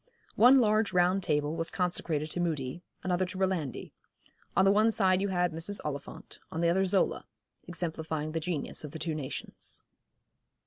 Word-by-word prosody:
One 255 +4 +7
large 215 -3 +2
round 180 +2 +3
table 150 -2 0
was 165 0 -1
consecrated 165 -4 -1
to - - -2
Mudie, 160 -3 -2 0.2
another 185 0 +1
to 185 +1 -4
Rolandi. 185 -8 -2 0.7
On 190 - +6
the 195 - +6
one 215 +2 +4
side 190 -3 +2
you 200 - +1
had 180 -2 +1
Mrs. 165 +6 -2
Oliphant, 140 -2 -6
on 165 - -3
the 170 - +3
other 190 +2 +2
Zola, 190 +1 +1 0.4
exemplifying 160 -2 -3
the 165 - -1
genius 160 -3 -4
of 150 - -7
the - - -5
two 160 0 -3
nations. 145 -4 -5
175 Hz, 170 wpm, -30 LUFS, 155-190 Hz, 0.7 s, One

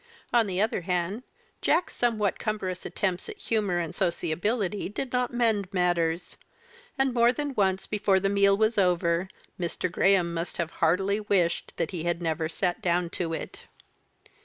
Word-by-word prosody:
On 235 -3 +4
the 185 -1 -2
other 215 -2 +1
hand. 180 +4 -1 0.4
Jack's 345 +3 +1
somewhat 215 -5 +1
cumbrous 190 -4 -3
attempts 185 - -2
at 430 - -7
humour 210 - 0
and 170 -1 -2
sociability 185 +5 -1
did 245 +5 -5
not 250 0 +1
mend 225 -6 +1
matters; 175 -2 0 0.6
and 270 -1 +2
more 235 0 +5
than 285 +2 -3
once 190 -4 +1
before 205 -2 +2
the 195 - 0
meal 200 0 +4
was 220 0 +2
over 175 -1 +2 0.3
Mr. 175 0 -2
Graham 185 -2 +3
must 165 +1 -4
have 170 -1 -2
heartily 190 +5 +2
wished 190 -5 0
that 165 - -1
he 175 -4 -4
had 170 +1 -1
never 160 -1 -1
sat 180 +5 -1
down 175 -2 +1
to 170 -3 -2
it. - - -7
190 Hz, 160 wpm, -27 LUFS, 175-215 Hz, 0.6 s, more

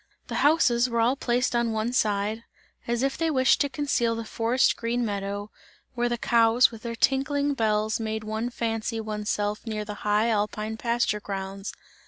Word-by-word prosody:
The - - -1
houses 255 -5 +4
were 235 -1 -1
all 240 +4 +3
placed 245 -2 0
on 235 -1 +1
one 220 +2 -1
side, 215 -1 0 0.4
as 240 +1 0
if 275 0 -1
they 330 -1 +1
wished 260 -4 +3
to 285 - +1
conceal 265 -5 0
the 230 0 -5
forest 235 +3 +2
green 235 +1 -1
meadow, 200 0 -4 0.4
where 240 -1 0
the 240 - -1
cows 230 +1 +4
with 225 -2 -10
their 230 0 -5
tinkling 280 +4 +1
bells 215 -3 0
made 220 -1 -3
one 220 +2 -3
fancy 225 -1 -2
one's 210 -1 -4
self 210 0 -1
near 215 -1 -3
the 210 - -5
high 210 +2 +2
alpine 215 0 -1
pasture 235 -2 0
grounds. 195 0 -5
230 Hz, 180 wpm, -26 LUFS, 215-240 Hz, 0.4 s, houses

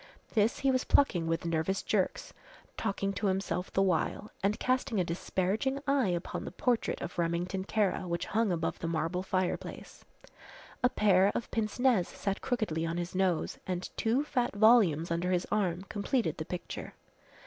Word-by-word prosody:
This 220 0 +2
he 275 - +3
was 255 0 +1
plucking 180 -13 +3
with 165 +1 -1
nervous 165 +3 0
jerks, - - -1 0.4
talking 195 0 -1
to 200 +2 -1
himself 190 -1 -1
the 195 - +2
while, 190 +3 0
and 200 +2 +1
casting 255 -4 0
a - - +3
disparaging 190 +9 -1
eye 275 -5 +2
upon 175 -1 -2
the - - -6
portrait 245 -3 0
of 175 0 -6
Remington 175 +3 -1
Kara 200 -3 0
which 170 0 -2
hung 220 -1 +1
above 165 -2 -1
the 165 - -3
marble 165 +2 -1
fireplace. 185 -1 -3 0.8
A 250 - +5
pair 200 -4 +4
of 235 - -3
pince 215 -2 -1
nez 245 -8 +3
sat 195 0 -3
crookedly 215 -10 -1
on 165 +1 -2
his 175 0 -3
nose 185 -3 0
and 180 -1 -4
two 235 +6 +1
fat 245 -7 -1
volumes 205 -8 +5
under 170 +2 0
his 180 -1 +1
arm 185 -4 0
completed 215 +5 -1
the - - -3
picture. - - -6
190 Hz, 170 wpm, -31 LUFS, 175-220 Hz, 0.8 s, A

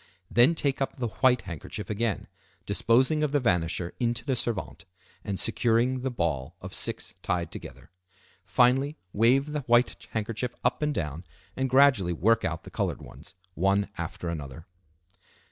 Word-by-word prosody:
Then 125 +8 +5
take 140 -3 0
up 135 - -1
the 120 -4 -2
white 125 -1 +3
handkerchief 90 +3 -6
again, 110 -1 -1 0.4
disposing 130 +6 +2
of 150 -2 +1
the 145 - +4
vanisher 90 -6 0
into 120 -1 -1
the 135 -2 +1
servante, 110 -5 -3 0.4
and 100 -3 -3
securing 120 +2 +2
the 130 - -1
ball 85 - -2
of - - -8
six - - -1
tied 85 -3 -1
together. - - -10 0.5
Finally 135 +5 +3 0.2
wave 130 +7 +3
the 150 -1 -2
white 120 +1 +3
handkerchief 115 +3 -2
up 125 - +1
and 150 0 +1
down, 80 - -3 0.3
and 135 0 -1
gradually 130 -9 +5
work 110 +7 +2
out 80 -3 -2
the - - -11
colored - - -2
ones, - - -13 0.2
one 100 +3 +1
after 85 +1 -5
another. 80 -1 -6
115 Hz, 155 wpm, -27 LUFS, 90-130 Hz, 0.5 s, Then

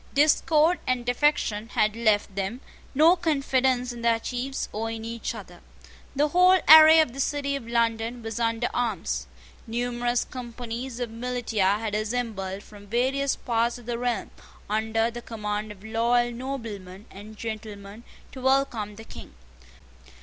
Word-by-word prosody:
Discord 305 +3 +4
and 255 -1 0
defection 245 -4 +1
had 215 0 +2
left 215 -3 +1
them 200 +6 -3 0.3
no 320 +5 +6
confidence 265 -6 +1
in 235 - -9
their 230 -1 +2
chiefs 255 +3 -3
or 225 +2 -3
in 225 0 -6
each 230 0 -4
other. - - -11 0.6
The 295 +2 +2
whole 365 +3 +6
array 315 +1 +10
of 300 -7 -1
the 275 - -9
City 280 0 -1
of 260 -5 -6
London 230 0 0
was 225 0 -4
under 230 +1 0
arms. 175 - -2 0.4
Numerous 240 +1 -1
companies 240 0 -6
of 240 -2 -3
militia 225 -4 0
had 215 -1 -4
assembled 210 -3 -3
from 205 -1 -14
various 260 +5 +1
parts 235 0 0
of 240 - -14
the 235 0 -3
realm, 245 -1 -2 0.4
under 225 +2 0
the 240 +1 -7
command 210 -2 -4
of 205 -1 -13
loyal 240 +2 +1
noblemen 225 -7 -7
and 210 +2 -11
gentlemen, 215 -1 -7 0.3
to 260 - -9
welcome 250 -6 +1
the 220 - -10
King. 60 - -12
235 Hz, 150 wpm, -26 LUFS, 220-255 Hz, 0.6 s, array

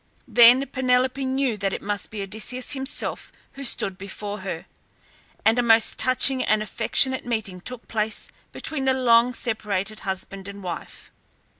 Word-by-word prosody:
Then 245 +3 +6
Penelope 255 0 0
knew 260 -3 -1
that 195 -1 -2
it - - -3
must 205 0 -3
be 210 -2 -5
Odysseus 220 +6 -2
himself 270 0 -2 0.2
who 275 - -9
stood 195 -7 0
before 205 +1 -7
her, 185 -2 -6 0.8
and 225 +2 +4
a - - +4
most 225 -1 +3
touching 255 +1 +5
and 215 0 +1
affectionate 260 +4 +2
meeting 220 -6 -4
took 250 +4 -8
place 215 -1 -2 0.2
between 290 -4 -3
the 265 0 +2
long 240 -1 +4
separated 215 -3 -2
husband 190 0 -5
and 200 0 -10
wife. 175 -2 -8
225 Hz, 150 wpm, -23 LUFS, 200-255 Hz, 0.8 s, Then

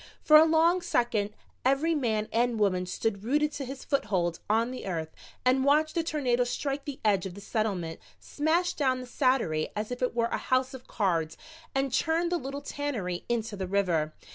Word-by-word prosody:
For 305 - +6
a 310 +1 +9
long 330 +3 +3
second 235 -10 0 0.3
every 275 +6 +2
man 220 -8 0
and 235 0 +1
woman 185 -3 +1
stood 200 +1 -2
rooted 295 +5 +1
to 280 - -5
his 265 +1 -8
foothold 185 - 0
on 225 +3 +2
the 255 - -6
earth 160 -4 -3 0.3
and 260 +1 +4
watched 305 +3 +3
the 335 - +1
tornado 265 -7 +1
strike 275 +3 -3
the 285 -2 -6
edge 195 -3 +2
of 180 - -9
the - - -9
Settlement, 195 -6 -2 0.2
smash 335 +4 0
down 260 -3 +1
the - - -7
saddlery 245 - +1
as 210 +2 -3
if 245 - -5
it 250 -2 0
were 235 -1 +2
a - - -1
house 255 0 0
of 260 -1 -10
cards, 165 -6 -1 0.4
and 270 -1 0
churn 330 +4 +1
the 350 -1 0
little 275 +2 -5
tannery 245 -12 -3
into 225 -2 -1
the 190 -2 -4
river. 175 -6 +1
245 Hz, 190 wpm, -28 LUFS, 200-285 Hz, 0.4 s, a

